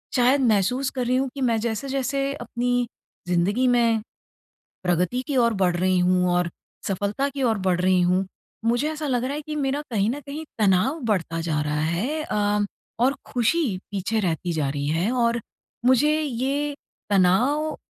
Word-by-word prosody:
शायद 260 +2 +4
महसूस 240 +6 +2
कर 250 -2 -1
रही 255 - +2
हूँ 265 0 0
कि 275 - -5
मैं 230 - +2
जैसे-जैसे 275 +4 -1
अपनी 245 -1 -1 0.4
ज़िंदगी 190 +8 +2
में 235 -2 +3 0.8
प्रगति 180 +7 +1
की 285 - -2
ओर 235 -2 +4
बढ़ 180 -1 +2
रही 185 +1 +2
हूँ 180 0 +3
और 175 -1 +1 0.4
सफलता 205 +8 -1
की 280 -1 -4
ओर 225 -4 +2
बढ़ 180 -1 +2
रही 185 0 +3
हूँ, 180 +2 +2 0.4
मुझे 240 +6 +1
ऐसा 305 0 -4
लग 250 -3 0
रहा 265 - -2
है 300 - -3
कि 305 -1 -4
मेरा 280 0 -1
कहीं 210 -1 +1
न 285 - -4
कहीं 295 +3 -6
तनाव 215 - +2
बढ़ता 165 -4 -2
जा 160 -2 -1
रहा 150 0 -1
है 200 - -1
अ, 205 0 0 0.4
और 260 +3 +3 0.2
खुशी 285 +7 +2 0.2
पीछे 200 +2 -1
रहती 175 -2 -1
जा 155 -4 0
रही 140 +1 -2
है। 165 +8 +1
और 235 -1 +1 0.4
मुझे 290 +5 +4
ये 285 +1 -1 0.4
तनाव 250 +12 +3
235 Hz, 170 wpm, -24 LUFS, 185-270 Hz, 0.8 s, शायद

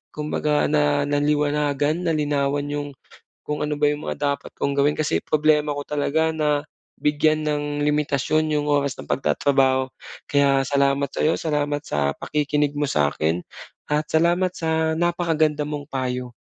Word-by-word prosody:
kumbaga 150 0 0
na 145 -1 +2
naliwanagan, 145 +2 +1
nalinawan 145 -2 0
'yong 145 0 -3 0.6
kung 150 0 -2
ano 150 0 -2
ba 150 - +3
'yong 150 - -6
mga - - -2 0.2
dapat - - -11
kong 140 - 0
gawin 145 +1 +2
kasi 85 - 0
problema 150 -1 +2
ko 145 - -3
talaga 150 +2 0
na 150 -2 0 0.3
bigyan 155 +1 +1
ng 150 -1 0 0.2
limitasyon 150 +1 +1
'yong 145 - -1
oras 140 -2 +1
ng - - -8
pagtatrabaho, 135 -1 +2 0.4
kaya 140 -1 +3
salamat 140 0 +1
sa - - -4
'yo, 160 - +3
salamat 145 -2 -1
sa 70 -1 0
pakikinig 150 -1 0
mo 145 - +1
sa 75 -1 +2
akin 80 +3 -1 0.5
at 150 +1 +1
salamat 175 +3 +2
sa 160 -1 0
napakaganda 165 -3 +1
mong 145 -1 -5
payo. 125 -2 -3
145 Hz, 150 wpm, -23 LUFS, 140-150 Hz, 0.6 s, ba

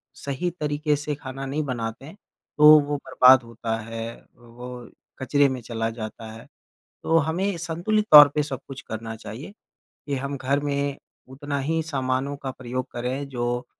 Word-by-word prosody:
सही 140 +6 -3
तरीके 150 0 0
से 150 +1 -3
खाना 135 -1 -7
नहीं 145 +3 -2
बनाते 120 -2 -4
हैं, 160 - -11 0.4
तो 150 0 +9
वो 145 0 -2
बर्बाद 130 -2 +5
होता 115 -1 -4
है, 115 +1 -6 0.2
वो 120 0 -11 0.3
कचरे 145 +2 +3
में 130 -1 -4
चला 115 -1 -3
जाता 110 0 -7
है। 115 +1 -12 0.6
तो 165 - +3
हमें 170 +5 0
संतुलित 175 +6 -1
तौर 150 -1 +12
पे 150 - +2
सब 135 -3 -5
कुछ 135 -1 -8
करना 110 0 -6
चाहिए, 115 - -9 0.5
कि 145 - -2
हम 140 +1 -3
घर 135 +2 0
में 140 -1 -2 0.3
उतना 140 +2 -4
ही 160 +4 -1
सामानों 135 -2 -2
का 135 -1 -5
प्रयोग 130 0 -5
करें 130 +3 -3
जो 120 -1 -2
135 Hz, 165 wpm, -24 LUFS, 120-145 Hz, 0.6 s, तौर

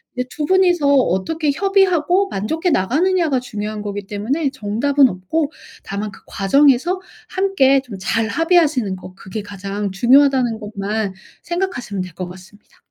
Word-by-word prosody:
이제 250 0 -2
2 300 - -3
분이서 355 -3 +3
어떻게 280 - +1
협의하고 385 0 +2
만족해 320 - -1
나가느냐가 310 - +1
중요한 215 -3 -5
거기 205 -1 -5
때문에 260 +10 -1
정답은 260 +7 +2
없고 280 - -2 0.3
다만 205 +2 -4
그 - - -15
과정에서 280 - +2 0.3
함께 325 -9 +2
좀 240 -7 -9
잘 220 +3 0
합의하시는 310 - +2
거 185 0 -11
그게 195 +3 -7
가장 200 0 -5
중요하다는 250 +2 +3
것만 210 -1 -3 0.3
생각하시면 345 - -3
될 180 -2 -10
것 180 +1 -6
같습니다. 190 +3 -16
250 Hz, 335 characters per minute, -19 LUFS, 205-320 Hz, 0.3 s, 분이서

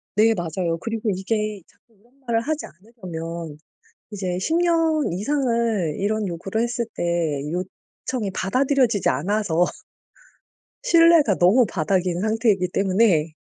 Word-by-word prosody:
네 225 +2 +4
맞아요. 170 -1 -2
그리고 225 -1 -3
이게 210 +1 -2
자꾸 230 - -31
이런 240 +4 -29
말을 230 -1 +1
하지 305 +3 -3
않으려면 170 -6 -8 0.5
이제 185 -3 -3
10 320 - -1
년 330 - +2
이상을 230 - 0
이런 210 +1 -1
요구를 190 +6 -3
했을 240 0 -1
때 - - -3 0.5
요청이 195 +4 -5
받아들여지지 255 +1 +1
않아서 175 +3 +1 1.2
신뢰가 335 - +5
너무 215 +8 +4
바닥인 180 0 -1
상태이기 215 -4 +1
때문에 185 -5 +2
210 Hz, 275 characters per minute, -22 LUFS, 180-235 Hz, 1.2 s, 신뢰가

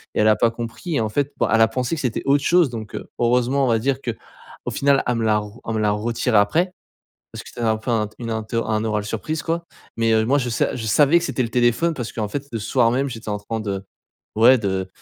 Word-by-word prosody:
Et - - +2
elle 110 - +5
a 110 - +4
pas 115 - +3
compris. 120 - -5
Et 120 - +2
en 110 - -1
fait, 145 +5 -1
bon, - - +1
elle 115 - +4
a 115 - +6
pensé 125 +6 -2
que 150 - -5
c'était 125 -4 -1
autre 140 +1 +2
chose, 175 -4 +4
donc, 110 -3 -7
heu, - - -7
heureusement, 125 +3 +2
on - - 0
va 115 -2 +3
dire, 135 +3 0
qu'au 120 -4 -8
final 140 0 +2
elle 125 - 0
me 115 -1 -1
l'a 105 -1 +3
re 105 +3 -9
elle 115 - -1
me 110 - -1
l'a 105 -1 +2
retirée 115 +2 0
après, 160 - +2 0.6
parce - - -7
que - - -12
c'était - - -10
un 110 -1 +2
peu 110 - -4
un 110 -3 +1
t 105 - -24
une 115 -2 -5
interr 110 +1 -2
un 110 0 0
oral 105 -2 -1
surprise, 150 +9 -3
quoi. 170 +1 -2 0.3
Mais, 115 0 +2
heu, 110 0 +3
moi 135 +4 +3
je 125 -3 -2
sa 110 - 0
je 115 - -5
savais 145 +8 +5
que 170 - -5
c'était 130 - -1
le - - -3
téléphone, 125 +8 +2
parce 125 -6 -5
qu'en 110 -2 -3
fait, 140 +5 -5
le 115 - -2
soir 115 +2 +2
même, 135 +3 0
j'étais 115 -3 -8
en 105 - -2
train 110 +2 -4
de, 100 -2 -4 0.5
ouais, 125 +4 +6
de 95 -3 -2
115 Hz, 275 wpm, -22 LUFS, 110-135 Hz, 0.6 s, a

